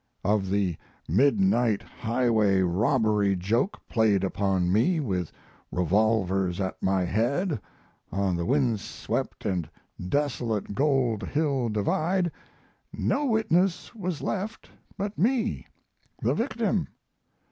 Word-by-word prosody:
Of 100 -1 +1
the 95 -4 0 0.3
midnight 125 - +3
highway 110 -5 +1
robbery 105 +1 +2
joke 115 - 0
played 105 -4 +2
upon 95 -2 +1
me 145 - +3
with 95 - -2 0.4
revolvers 95 0 +1
at 95 -1 -3
my 95 -1 +2
head 125 - 0 0.5
on 95 -1 0
the 85 - -2
windswept 120 -2 -1 0.4
& 90 - -10
desolate 120 -8 -1
Gold 130 -5 +1
Hill 135 +2 0
Divide 165 - 0 0.6
no 290 +2 0
witness 195 -6 +1
was 185 -8 -4
left 210 +3 -4 0.3
but 200 +1 -4
me, 235 +4 +1 0.5
the - - +1
victim. - - 0
110 Hz, 105 wpm, -27 LUFS, 95-150 Hz, 0.6 s, midnight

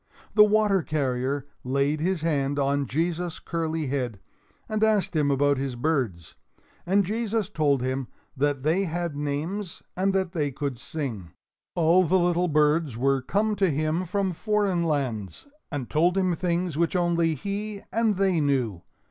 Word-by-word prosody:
The 210 - +8
water 210 -2 +3
carrier 135 -2 -1 0.2
laid 140 +4 0
his 180 +1 0
hand 145 -3 0
on 140 0 +1
Jesus' 170 +4 -1
curly 160 -2 -2
head 125 -6 -2 0.5
and 215 0 -1
asked 210 -5 +2
him 150 -2 +2
about 140 0 +2
his 135 -2 -3
birds; 120 - -1 0.5
and 195 +2 +3
Jesus 220 0 -1
told 145 -9 +1
him 130 0 -2 0.3
that 140 0 0
they 170 +6 +2
had 170 -2 -3
names 155 +7 -3
and 190 +2 +1
that 190 -2 0
they 150 -5 0
could 135 -2 -4
sing. 125 - -5 0.5
All 170 +2 +4
the 185 +2 +3
little 175 0 +2
birds 150 -4 +2
were 135 +2 +2
come 210 +10 0
to 195 -1 +3
him 155 +4 0
from 190 +1 0
foreign 200 -2 0
lands, 120 - -2 0.3
and 140 -6 -3
told 175 +4 +2
him 185 -2 +2
things 175 -2 -1
which 170 +2 +1
only 170 -2 +2
he 200 +6 -4
and 225 -2 +2
they 190 -3 +2
knew. 125 - 0
160 Hz, 155 wpm, -26 LUFS, 140-185 Hz, 0.5 s, The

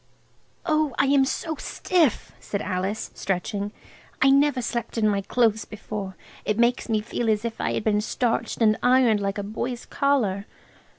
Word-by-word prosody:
"Oh, 310 -5 +1
I - - +4
am 275 0 +4
so 315 +3 -3
stiff," 330 - 0
said 200 - -4
Alice, 190 +4 -3
stretching. 200 +2 -2 0.5
"I 270 +1 +5
never 280 -1 +4
slept 235 -1 -3
in 215 -1 +3
my 200 -1 +1
clothes 220 +1 +1
before. 210 -3 -6 0.3
It 210 - -1
makes 240 +1 +2
me 215 -1 +1
feel 230 +1 -2
as 215 +1 +1
if 230 -1 -4
I - - 0
had - - -2
been 210 -1 +2
starched 230 +1 -1
and 215 -1 +4
ironed 245 -4 +4
like 200 0 -2
a 205 - -2
boy's 235 +4 -4
collar." 225 -9 0
225 Hz, 170 wpm, -25 LUFS, 205-260 Hz, 0.5 s, I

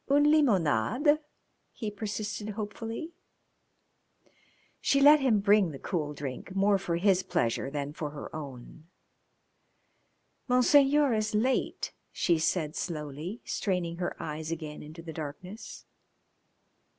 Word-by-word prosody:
"Une 290 +1 +5
limonade?" 250 - +3 0.5
he 215 -3 -5
persisted 210 0 -4
hopefully. 225 +8 -5 1.7
She 275 - +2
let 295 +2 +8
him 250 -6 +3
bring 200 -2 +4
the 145 - -7
cool 150 -1 -3
drink 140 +6 -6
more 200 0 +3
for 175 -3 -2
his 190 +1 +3
pleasure 120 -4 -1
than 145 0 -4
for 150 -1 -4
her 145 +1 -8
own. 145 +1 -9 1.6
"Monseigneur 275 +2 +5
is 215 -1 0
late," 255 +5 0 0.2
she 170 -3 +1
said 155 -1 0
slowly, 155 - -5
straining 180 -4 -1
her 175 0 -3
eyes 155 +1 -5
again 155 -2 -5
into 155 +3 -10
the 165 -1 -7
darkness. 165 +8 -8
185 Hz, 115 wpm, -29 LUFS, 155-220 Hz, 1.7 s, let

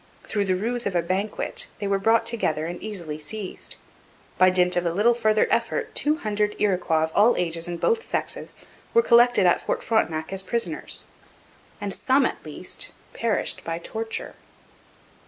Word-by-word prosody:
Through 205 -1 -1
the 185 -1 +1
ruse 235 +5 -1
of 195 - -3
a 170 - +2
banquet 205 - -1
they 205 - -4
were 195 0 +1
brought 225 +3 +3
together 160 -10 -1
and 175 +1 -5
easily 175 -8 -5
seized. 190 +6 -6 0.6
By 185 - +7
dint 180 -1 +3
of 175 - +1
a 170 - 0
little 210 +7 +4
further 215 -2 +3
effort - - 0
two 300 +1 +2
hundred 210 -5 -1
Iroquois 180 -5 +2
of 160 - -2
all 215 +4 +5
ages 165 -1 -1
and 175 -1 -4
both 460 -1 +2
sexes - - -4 0.4
were 465 - +6
collected 240 - +5
at 175 - +4
Fort - - -2
Frontenac 165 -7 0
as 195 - +2
prisoners 230 +4 -2 0.7
and 205 -2 -3
some 270 0 +2
at - - -3
least - - -5 0.2
perished 230 -2 -1
by 165 0 -3
torture. 225 +6 -5
200 Hz, 170 wpm, -25 LUFS, 175-230 Hz, 0.7 s, By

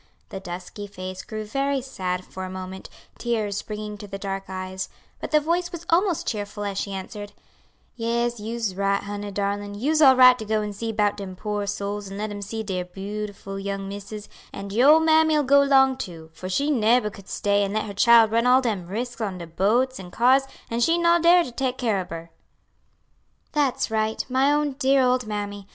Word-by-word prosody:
The 195 - -6
dusky 185 +2 -7
face 185 -1 -7
grew 215 -1 -6
very 275 +5 0
sad 185 -8 -4
for 190 - -8
a 185 - -5
moment, 185 0 -7 0.3
tears 215 -4 -1
springing 210 -1 -6
to 205 - -8
the 195 0 -6
dark 195 -1 -4
eyes; 185 0 -5 0.3
but - - -5
the 305 - +4
voice 345 +3 -1
was 340 -1 -8
almost 355 0 +2
cheerful 205 -1 -4
as 200 -1 -2
she 200 - -3
answered, 205 +2 -7 0.6
"Yes, 235 0 -1
you's 225 -1 -3
right, 200 +1 0
honey 205 0 -5
darlin' 205 0 -2
you's 300 +9 +1
all 265 -3 +8
right 255 -1 +7
to - - -4
go 215 0 0
and 210 -1 -5
see 225 +2 -3
'bout 210 -1 +1
dem 195 -2 -7
poor 205 +1 -3
souls 205 0 -3
and 195 +1 -7
let 210 +1 -3
'em 205 0 -6
see 220 +2 -4
dere 185 -3 -3
beau'ful 195 +1 -6
young 195 0 -3
missus; 205 +1 -7 0.2
and 200 0 -7
your 250 +6 +5
ole 320 - +6
mammy 315 -1 +4
'll 295 - +2
go 280 +1 +5
'long 265 -1 +5
too, 165 -9 -8
for 185 - -7
she 285 +10 +1
neber 230 -3 +3
could 195 -1 -14
stay 205 0 +1
and 200 +1 -2
let 215 - 0
her 205 - -6
chile 230 +2 +6
run 230 +2 +1
all 255 +1 +6
dem 210 -9 -2
risks 235 +5 -4
on 195 -4 -2
de 170 - -7
boats 225 +10 +1
an' 180 -2 -9
cars 255 +7 +4 0.3
an' 230 - -1
she 330 +8 +3
no 340 0 +4
dar 345 +1 +6
to 250 - -7
take 255 +1 -2
care 225 -6 0
ob 180 - -6
her." 165 0 -8 1.2
"That's 280 -6 0
right, 220 0 0
my 265 +2 +3
own 295 0 +1
dear 270 -1 +4
old 250 -2 +1
mammy. 205 -1 -4
210 Hz, 210 wpm, -24 LUFS, 195-255 Hz, 1.2 s, all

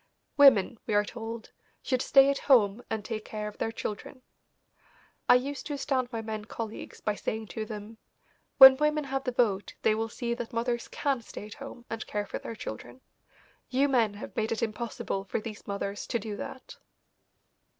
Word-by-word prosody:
Women, 245 -7 +6
we 215 - +1
are 205 0 +4
told, 225 0 -7 0.3
should 255 -1 0
stay 275 0 +6
at 280 - -2
home 220 -4 +5
and 220 -2 -3
take 215 -2 -4
care 210 -1 -5
of 210 - -9
their 225 - -1
children. 225 +4 -6 1.1
I - - +9
used 275 +3 -1
to 295 - -3
astound 265 -3 -1
my 225 -2 -4
men 215 -1 -5
colleagues 225 0 -7
by 210 - 0
saying 220 +1 -4
to 220 -1 -4
them: 215 +1 -8 0.6
"When 265 -1 +11
women 300 +1 +1
have 270 -1 -3
the 250 - 0
vote 215 -5 0
they 215 - +4
will 225 +1 -2
see 235 +2 -3
that 235 -1 -6
mothers 235 +1 -1
can 275 -4 -1
stay 220 - -9
at 210 - -9
home 275 -3 -10
and 225 0 -5
care 205 0 -2
for - - -5
their 230 - -7
children. 120 - -8 0.7
You 270 +2 +3
men 230 -6 +2
have 205 - -9
made 220 0 -1
it 230 - -1
impossible 215 -3 -3
for 190 - -2
these 215 -1 -8
mothers 200 0 -4
to 240 - 0
do 220 -2 -5
that." 260 +5 -8
225 Hz, 190 wpm, -29 LUFS, 210-255 Hz, 1.1 s, When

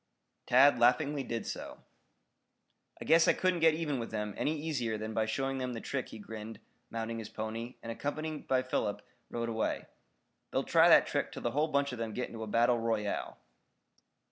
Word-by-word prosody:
Tad 135 +3 +6
laughingly 140 +4 +3
did 115 -3 -4
so. - - -7 1.2
"I - - -7
guess 165 0 +5
I - - +6
couldn't 185 -2 +1
get 160 -1 +5
even 150 -5 -2
with 115 - -4
them 105 -1 -3
any 155 +1 -1
easier 130 -8 -2
than 110 +1 -5
by 110 0 +1
showing 135 +4 -1
them 125 -1 -2
the 115 - -4
trick," 130 +2 -3
he - - -9
grinned, 110 +1 -8 0.3
mounting 115 0 -4
his 110 - -7
pony, 115 +3 -5
and 115 - -4
accompanied 155 +5 -4
by 130 -1 +2
Philip 115 -5 -2 0.3
rode 115 0 -3
away. 110 -1 -1 0.6
"They'll - - 0
try - - +5
that - - +8
trick - - -1
till - - -8
the 120 - 0
whole 150 +5 +1
bunch 140 -2 +1
of 125 - -6
them 115 -1 -3
get 125 - -2
into 115 - -8
a 110 - -4
battle 120 +2 +3
royal." 110 -3 -2
120 Hz, 195 wpm, -32 LUFS, 110-140 Hz, 1.2 s, that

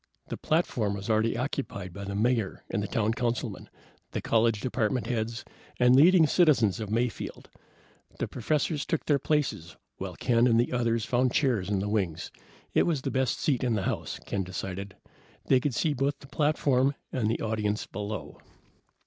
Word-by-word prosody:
The - - -4
platform 120 -11 0
was 100 +3 -3
already 110 +2 +2
occupied 120 -8 -4
by 100 0 -7
the 100 0 -4
Mayor 110 -1 0
and 105 - 0
the 100 - -2
town 110 +2 0
councilmen, 120 -4 -3 0.4
the - - -1
college 115 -1 +2
department 125 0 -1
heads, 115 0 -3 0.3
and 125 0 +6
leading 165 +4 +7
citizens 145 - +3
of 110 -2 -4
Mayfield. 115 0 -3 0.7
The - - -2
professors 150 +4 -1
took 165 - -2
their 145 -2 +3
places, 135 - -1 0.2
while - - -5
Ken 120 0 +3
and 115 -1 +4
the 120 - +1
others 115 -2 +1
found 125 0 +1
chairs 120 - +1
in 105 - +1
the 95 +2 -1
wings. 95 -6 -1 0.4
It - - +3
was 150 -6 0
the - - -2
best 130 -2 0
seat 135 -5 +1
in 120 -3 +1
the 100 - -1
house, - - -3
Ken 100 - -2
decided. 95 +1 -5 0.5
They 130 - +4
could 130 -1 -2
see 155 +2 +1
both 140 +1 0
the - - -15
platform 140 -2 +2 0.2
and 115 -4 0
the 115 - 0
audience 105 -1 -1
below. 105 +1 -6
115 Hz, 175 wpm, -28 LUFS, 105-135 Hz, 0.7 s, leading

